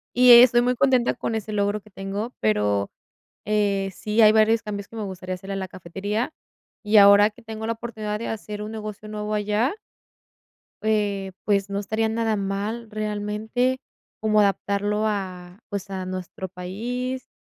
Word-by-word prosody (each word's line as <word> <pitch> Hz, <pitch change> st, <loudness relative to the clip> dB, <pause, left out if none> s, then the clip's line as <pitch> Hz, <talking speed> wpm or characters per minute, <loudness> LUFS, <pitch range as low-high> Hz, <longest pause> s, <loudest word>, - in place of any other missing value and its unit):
y 250 Hz, 0 st, +7 dB
estoy 240 Hz, 0 st, +9 dB
muy 250 Hz, +1 st, +1 dB
contenta 255 Hz, -1 st, +3 dB
con 225 Hz, -, -3 dB
ese 215 Hz, 0 st, -4 dB
logro 205 Hz, 0 st, 0 dB
que 215 Hz, -, -20 dB
tengo, 195 Hz, +5 st, -5 dB
pero, 105 Hz, -2 st, +1 dB, 0.6 s
eh, 200 Hz, -2 st, +1 dB
sí 215 Hz, +2 st, +1 dB
hay 215 Hz, 0 st, +8 dB
varios 220 Hz, +1 st, +4 dB
cambios 205 Hz, -2 st, -5 dB
que 230 Hz, -, -14 dB
me 215 Hz, -, -3 dB
gustaría 185 Hz, -1 st, -5 dB
hacerle 195 Hz, +2 st, -7 dB
a -, -, -3 dB
la 190 Hz, -1 st, -3 dB
cafetería, 200 Hz, -, -4 dB, 0.5 s
y 210 Hz, +1 st, +3 dB
ahora 200 Hz, +1 st, +8 dB
que 240 Hz, -, -18 dB
tengo 220 Hz, 0 st, -6 dB
la 230 Hz, -, 0 dB
oportunidad 220 Hz, -2 st, -5 dB
de 230 Hz, -, -4 dB
hacer 210 Hz, -1 st, -5 dB
un 215 Hz, -, -6 dB
negocio 215 Hz, -1 st, -7 dB
nuevo 210 Hz, 0 st, -4 dB
allá 210 Hz, -, 0 dB, 1.1 s
eh, 205 Hz, -3 st, 0 dB
pues 200 Hz, -1 st, +1 dB
no 200 Hz, -, -1 dB
estaría 220 Hz, +2 st, -1 dB
nada 225 Hz, -1 st, 0 dB
mal, 205 Hz, +4 st, -3 dB
realmente, 215 Hz, +4 st, -1 dB, 0.4 s
como 215 Hz, -1 st, +3 dB
adaptarlo 205 Hz, +1 st, +1 dB
a, 185 Hz, -2 st, -4 dB
pues, 200 Hz, -1 st, -5 dB
a 185 Hz, -1 st, -4 dB
nuestro 185 Hz, 0 st, -6 dB
país. 240 Hz, +8 st, -4 dB
210 Hz, 165 wpm, -24 LUFS, 195-220 Hz, 1.1 s, estoy